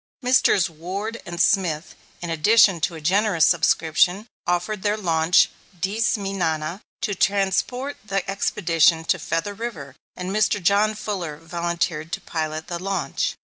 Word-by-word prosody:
Messrs. 250 -7 +4
Ward 190 +8 -6
and 175 0 -6
Smith, 170 -5 +1 0.3
in 170 - -3
addition 190 +2 +4
to 170 +1 -1
a 160 - -9
generous 185 0 +3
subscription, 170 +3 +2 0.2
offered 180 +4 -1
their 210 +2 0
launch 165 -3 +3 0.3
Dice 215 +6 0
mi 195 -1 -4
Nana, 165 0 -2 0.2
to 205 - 0
transport 200 +8 0
the 195 -3 -2
expedition 165 -4 +2
to 185 - +1
Feather 165 +6 -2
River, 195 - -7 0.2
and 180 +1 -5
Mr. 215 0 +2
John 205 +4 +2
Fuller 185 -8 -4
volunteered 170 -1 -3
to - - -3
pilot 155 -1 -4
the 175 -1 -5
launch. 185 -7 -2
180 Hz, 140 wpm, -23 LUFS, 165-205 Hz, 0.3 s, Messrs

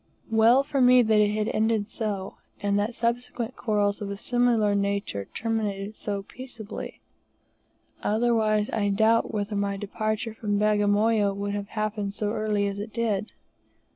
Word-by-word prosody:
Well 230 +4 +5
for 275 -1 -1
me 250 0 +7
that 215 -1 +3
it 210 +1 +1
ended 220 -1 +1
so, 205 -4 -4 0.2
and 200 0 +1
that 215 +3 -1
subsequent 240 +1 -2
quarrels 205 -3 0
of 200 - -4
a 200 - -4
similar 235 -2 +2
nature 200 - -1
terminated 215 - -3
so 200 -2 -4
peaceably, 235 -2 -9 1.0
otherwise 215 -1 +2
I 205 -2 0
doubt 220 +3 +3
whether 205 0 -2
my 200 0 -1
departure 215 +3 -3
from 210 -2 -1
Bagamoyo 205 0 +2
would 200 0 -3
have 205 -1 -3
happened 210 -1 -2
so 210 -1 -1
early 210 -2 0
as 200 0 -3
it 210 +2 -6
did. 220 -2 -1
215 Hz, 145 wpm, -26 LUFS, 205-225 Hz, 1.0 s, me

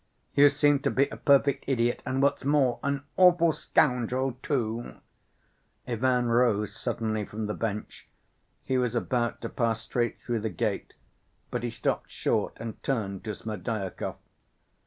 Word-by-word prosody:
"You 145 +1 +7
seem 145 0 +3
to - - 0
be 140 +1 +2
a - - -7
perfect 140 -1 +3
idiot, 120 -3 +1
and 130 +1 0
what's 140 - +2
more... 135 -3 +2
an 140 -1 -1
awful 175 -3 +6
scoundrel, 130 -3 +1
too." 120 -4 -2 0.9
Ivan 125 +1 +1
rose 115 -4 +2
suddenly 110 -2 -2
from 105 +2 -5
the 105 - -2
bench. 105 -2 -4 0.6
He 130 -1 +1
was 125 -1 0
about 120 0 -1
to 115 - -4
pass 115 -2 0
straight 120 0 -1
through 120 -2 -2
the 110 +1 -2
gate, 90 - -3 0.6
but 120 - -2
he 120 - -2
stopped 115 - -2
short - - -1
and 110 -1 -7
turned 100 -8 -2
to 105 -2 -3
Smerdyakov. 110 -3 -4
120 Hz, 150 wpm, -28 LUFS, 110-135 Hz, 0.9 s, You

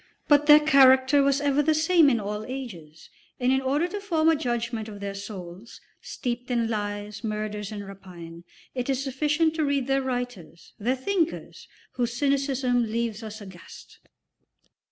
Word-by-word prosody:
But 295 0 +4
their 300 0 +9
character 275 -2 +5
was 275 0 +2
ever 285 0 +2
the 310 +1 +2
same 320 -1 +4
in 240 -4 +1
all 210 +1 -4
ages, 180 - -9 0.3
and 250 0 +2
in 265 0 +2
order 285 +6 0
to 410 - -5
form 325 -5 +2
a 325 - +4
judgment 235 -5 -3
of 205 -1 -9
their 200 0 -5
souls, 195 0 -9 0.2
steeped 245 -1 -5
in 235 -2 +1
lies, 205 -1 -4
murders, 210 -1 -4
and 205 -2 -7
rapine, 175 -4 -11 0.3
it 250 0 -4
is 270 0 0
sufficient 300 +4 0
to 315 - +1
read 280 -2 0
their 270 +1 +1
writers, 245 -10 -6
their 245 +5 0
thinkers, 335 +5 -3 0.3
whose 240 -2 -1
cynicism 270 -4 0
leaves 230 -1 -2
us 215 0 -8
aghast. 190 -4 -13
245 Hz, 160 wpm, -25 LUFS, 210-280 Hz, 0.3 s, their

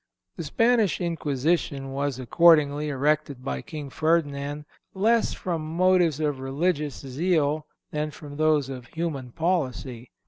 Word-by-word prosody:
The - - -5
Spanish 230 - +2
Inquisition 150 -4 -1
was 140 -1 -2
accordingly 150 +2 +4
erected 145 -1 0
by 65 -1 -2
King 145 - -7
Ferdinand, 145 -2 0 0.3
less 225 +4 +3
from 170 -3 -3
motives 180 -4 +3
of 145 -3 -1
religious 145 +2 -1
zeal 150 +2 0 0.2
than 150 0 -2
from 145 -1 -10
those 155 -3 +3
of 130 -2 -7
human 150 -7 -4
policy. 130 -7 -2
150 Hz, 125 wpm, -26 LUFS, 140-170 Hz, 0.3 s, accordingly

